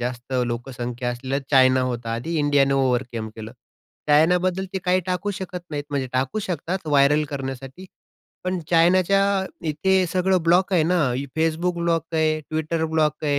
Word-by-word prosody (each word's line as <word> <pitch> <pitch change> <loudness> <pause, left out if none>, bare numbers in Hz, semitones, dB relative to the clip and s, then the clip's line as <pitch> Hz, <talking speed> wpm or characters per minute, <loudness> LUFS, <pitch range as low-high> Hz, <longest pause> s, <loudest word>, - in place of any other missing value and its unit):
जास्त 125 +1 -5
लोकसंख्या 120 0 -4
असलेला 130 +3 -3
चायना 130 -2 +5
होता 120 -1 -4
आधी, 140 +9 -4
इंडियाने 145 -2 +3
ओव्हरकम 125 -4 0
केलं. 110 0 -8 0.6
चायनाबद्दल 180 +5 +3
ते 190 - -1
काही 185 0 +3
टाकू 185 +3 -1
शकत 185 -2 -6
नाहीत, 145 -2 -4
म्हणजे 140 -2 -1
टाकू 130 +9 -1
शकतात 180 -2 -4
व्हायरल 145 +1 +4
करण्यासाठी. 135 +4 -6 0.6
पण 185 0 -1
चायनाच्या 180 +3 +4 0.5
इथे 185 +5 +2
सगळं 185 +1 +1
ब्लॉक 180 +4 +3
आहे 175 -4 +4
ना, 180 +3 +2 0.4
Facebook 165 +2 0
ब्लॉक 165 -1 +1
आहे, 155 -1 +1
Twitter 160 +1 -1
ब्लॉक 155 -1 0
आहे. 145 -1 +1
155 Hz, 150 wpm, -23 LUFS, 130-180 Hz, 0.6 s, चायना